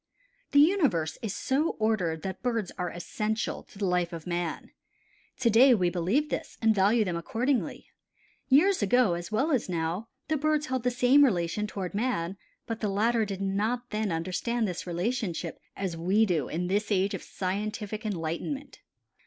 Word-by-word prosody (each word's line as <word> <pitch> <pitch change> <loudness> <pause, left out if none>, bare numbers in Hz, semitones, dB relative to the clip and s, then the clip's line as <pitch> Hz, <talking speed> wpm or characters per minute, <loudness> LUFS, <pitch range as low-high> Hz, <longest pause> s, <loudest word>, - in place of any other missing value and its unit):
The 285 - +4
universe 285 - +3
is 215 -3 -3
so 285 +5 0
ordered 190 -8 0
that 190 -1 -5
Birds 230 -6 -1
are 180 -1 -2
essential 210 +6 -3
to - - -18
the 200 - -1
life 180 -1 +1
of 165 -2 -7
Man. 175 -2 -3 0.7
To 235 - +4
day 250 +3 +7
we 180 -4 +1
believe 200 - 0
this - - -4
and 220 -1 +4
value 210 +3 +3
them 180 -3 -2
accordingly. 240 +10 -1 0.6
Years 315 +7 +4
ago 210 -1 +3
as 170 +3 -5
well 270 +9 +1
as 255 -8 +1
now 170 +5 -2 0.2
the 315 - +1
birds 305 +1 +1
held 260 -3 -1
the 250 - +1
same 250 +3 +5
relation 200 -3 +1
toward 190 -4 -5
man 200 -5 -1 0.3
but 230 -1 -4
the 210 - -1
latter 220 +3 +2
did 195 -1 -5
not 215 +6 -1
then 215 -2 -1
understand 185 +8 -1
this 180 -1 -5
relationship 180 -2 -2 0.2
as 190 -4 -2
we 190 +7 +3
do 165 -9 0
in 175 +3 -2
this 205 +4 0
age 195 0 +2
of - - -4
scientific 210 +3 -4
enlightenment. 210 - -4
210 Hz, 170 wpm, -28 LUFS, 180-245 Hz, 0.7 s, day